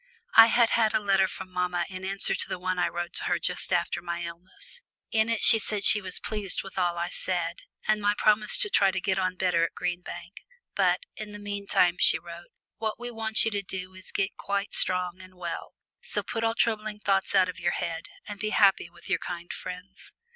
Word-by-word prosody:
I 225 0 +9
had 235 0 +3
had 220 -1 +2
a - - +3
letter 195 -2 +2
from 185 0 -8
mamma 180 -1 -1
in 185 -1 -8
answer 195 +1 -1
to - - -2
the - - -3
one 185 0 -2
I - - +2
wrote 175 0 -5
to - - -1
her 175 - +1
just 180 - 0
after 175 -1 0
my 170 0 -4
illness. 170 - -9 0.3
In 220 0 +2
it 230 -1 -1
she 225 - +10
said 210 -1 +3
she 210 - +6
was 185 -2 +3
pleased 210 -4 -3
with 195 0 -7
all 175 -1 0
I 170 +1 -2
said, 175 -2 -3 0.3
and 215 0 +2
my 205 0 +2
promise 215 0 +3
to 415 - +2
try 195 - +4
to 190 0 -2
get 190 0 -1
on 185 0 -1
better 180 -2 +1
at 170 - -2
Green 175 0 -3
Bank, 175 +1 -10 0.4
but - - +2 0.2
"in 215 -2 -7
the - - -7
meantime," 200 -3 +1
she - - +6
wrote, 170 +1 -11 0.3
"what 220 0 -3
we 240 0 -6
want 220 -1 +1
you 225 - 0
to 205 -1 -2
do 185 -1 -7
is 185 0 -13
to - - -3
get 195 0 -1
quite 200 0 -3
strong 180 0 +1
and 185 0 -15
well, 175 -2 -6 0.3
so - - -2
put 225 -1 -4
all 225 0 +1
troubling 215 -2 -1
thoughts 195 -1 +1
out 185 -1 +5
of 175 -2 -7
your 175 0 0
head 165 -1 -4 0.2
and 205 -2 -7
be 215 - -2
happy 195 -5 +3
with 170 0 -17
your 185 -1 0
kind 175 -1 -6
friends." 185 +2 -9
190 Hz, 230 wpm, -27 LUFS, 180-210 Hz, 0.4 s, she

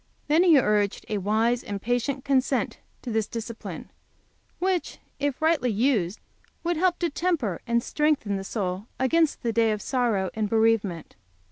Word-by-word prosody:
Then 310 +3 +4
he 345 -4 +6
urged 210 -5 +1
to - - -6
a - - +1
wise 220 +5 +1
and 200 -1 -4
patient 245 +5 -1
consent 270 -2 +1 0.2
to 245 - -4
this 220 -1 0
discipline, 230 0 -7 0.7
which, 370 -1 -1 0.2
if 285 -2 -1
rightly 315 -6 +3
used, 215 -4 +1 0.4
would 345 0 0
help 355 +1 +2
to 345 - 0
temper 290 - -1
and 235 0 +1
strengthen 295 -9 0
the 195 - -3
soul 195 0 -3
against 310 +4 +2
the 230 -1 0
day 225 -1 +3
of 210 - -1
sorrow 230 -7 0
and 215 -2 -1
bereavement. 220 -6 +1
235 Hz, 160 wpm, -26 LUFS, 210-285 Hz, 0.7 s, he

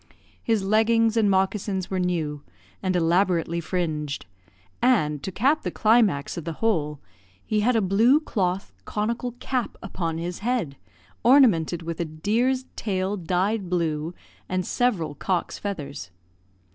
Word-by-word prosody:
His 225 -4 +1
leggings 225 +2 +3
and 220 -3 +3
moccasins 190 0 0
were 190 - 0
new, 160 -5 -1 0.4
and 185 -1 0
elaborately 170 -1 +2
fringed; 155 -5 -2 0.6
and, 150 - +2
to 190 - -4
cap 275 - +2
the - - -2
climax 215 -12 +2
of 170 - -4
the 165 +1 -4
whole, 155 -8 0 0.5
he 215 - 0
had 240 +4 +2
a 225 - +3
blue 225 +9 +4
cloth 195 - -2
conical 235 +3 -2
cap 255 -1 -3
upon 165 -4 -3
his 175 +2 -4
head, 220 - -1 0.5
ornamented 205 - +4
with 165 0 -5
a 170 - 0
deer's 225 +12 0
tail 195 -1 -1
dyed 185 +2 -1
blue, 165 -2 -1 0.3
and 185 -1 -1
several 190 -12 0
cock's 180 +5 -2
feathers. 145 - -5
190 Hz, 135 wpm, -25 LUFS, 165-225 Hz, 0.6 s, blue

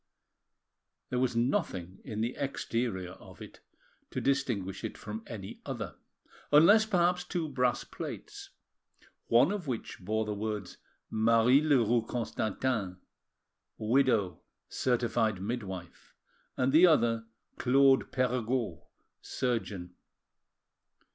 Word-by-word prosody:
There 125 - 0
was 125 -2 +1
nothing 115 - -1
in 110 -1 -4
the 120 +3 -1
exterior 115 -9 -2
of - - -14
it - - -11 0.5
to - - -3
distinguish 115 -9 -1
it - - -5
from 105 +1 -6
any 100 -5 -8
other, - - -5 0.6
unless 205 +9 +7
perhaps 180 -3 +2
two 175 -3 -3
brass 125 -3 0
plates, - - -8 0.8
one 125 +9 +5
of 200 -6 -4
which 120 -4 -4
bore 110 +3 -1
the 105 - -2
words 105 -2 -4 0.3
MARIE 115 +4 +4
LEROUX 120 -6 +2
CONSTANTIN, 110 -4 -2 0.8
WIDOW, 110 - +2 0.3
CERTIFIED 115 -5 0
MIDWIFE, 95 -5 -6 0.4
and 130 +1 +1
the 170 +4 +8
other 115 -8 +2 0.3
CLAUDE 135 +1 +4
PERREGAUD, 125 - -1 0.4
SURGEON. 105 -8 -3
120 Hz, 105 wpm, -30 LUFS, 105-135 Hz, 0.8 s, the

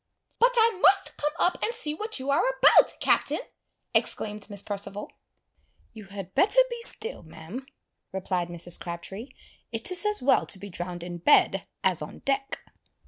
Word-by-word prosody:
"But - - +4
I 450 -4 +3
must 390 0 +4
come 295 0 -1
up 355 - +1
and 465 - -1
see 300 -7 -3
what 430 +7 -3
you 265 +2 -2
are 280 - +3
about, - - +6
Captain!" - - +1 0.5
exclaimed 210 0 -1
Miss 200 -1 -3
Perceval. 205 0 -5 0.8
"You 220 -2 -11
had 195 -1 -9
better 435 +6 +5
be 475 0 -5
still, 465 0 0
ma'am," 165 +11 -10 0.4
replied 185 -2 -2
Mrs. 175 0 -2
Crabtree. 190 +8 -7 0.4
"It 225 +9 0
is 360 0 +4
as 420 0 +4
well 265 +2 +2
to - - +3
be 200 +1 -10
drowned 175 0 -6
in 175 0 -7
bed 190 +2 +3 0.2
as 185 -4 +3
on 150 - -8
deck." 275 0 -2
210 Hz, 165 wpm, -26 LUFS, -, 0.8 s, about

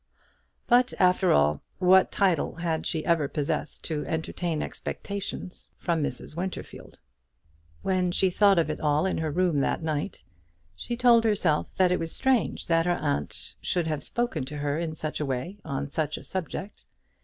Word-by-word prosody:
But, 245 +1 +4
after 185 0 +4
all, 75 0 +3 0.2
what 185 0 +5
title 185 -6 +1
had 165 -1 -2
she 160 -2 -2
ever 165 -4 +2
possessed 145 -1 -2
to 155 -3 -2
entertain 160 0 -2
expectations 200 -2 -5
from 170 -3 0
Mrs. 145 +1 -3
Winterfield? 185 +2 -6 0.9
When 185 -2 +1
she 190 +1 +2
thought 200 0 +5
of 160 -2 +2
it - - -5
all 150 +2 +2
in 190 - 0
her 160 -1 -1
room 170 -1 +1
that 140 - 0
night, 155 +3 -3 0.5
she 235 - -4
told 235 -2 +6
herself 190 -8 +1
that 185 -1 +4
it 180 - +2
was 165 0 -3
strange 265 -3 +1
that 165 0 +2
her 175 - +2
aunt 70 +1 -3
should 175 -2 0
have 155 -2 -2
spoken 235 - -1
to 150 +2 -7
her 145 +1 -1
in 165 -2 -3
such 155 -1 -4
a 150 - -1
way 135 +10 -3
on 140 +1 -4
such 155 -1 -1
a - - -10
subject. 190 +2 -5
165 Hz, 170 wpm, -27 LUFS, 150-190 Hz, 0.9 s, told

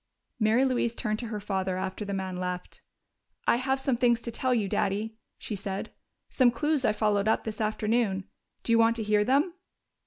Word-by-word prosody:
Mary 225 +4 +4
Louise 240 -3 0
turned 215 -3 -1
to 240 - -4
her 215 -1 -4
father 190 -2 -2
after 190 +2 -3
the 200 - -5
man 190 -2 -3
left. 180 0 -5 0.6
"I - - +4
have 265 +1 0
some 265 -2 +1
things 240 -1 +3
to 235 - -5
tell 255 +3 -1
you, 225 -5 +2
Daddy," 210 +4 -1 0.2
she 215 - -5
said. 195 0 -4 0.4
"Some 255 -2 +4
clues 295 +4 0
I - - +4
followed 210 -1 +1
up 220 - +2
this 220 -1 -4
afternoon. 215 -2 0 0.4
Do - - -1
you 230 - +5
want 230 0 +4
to 225 - -2
hear 210 0 +3
them?" 285 - +2
220 Hz, 195 wpm, -28 LUFS, 200-240 Hz, 0.6 s, you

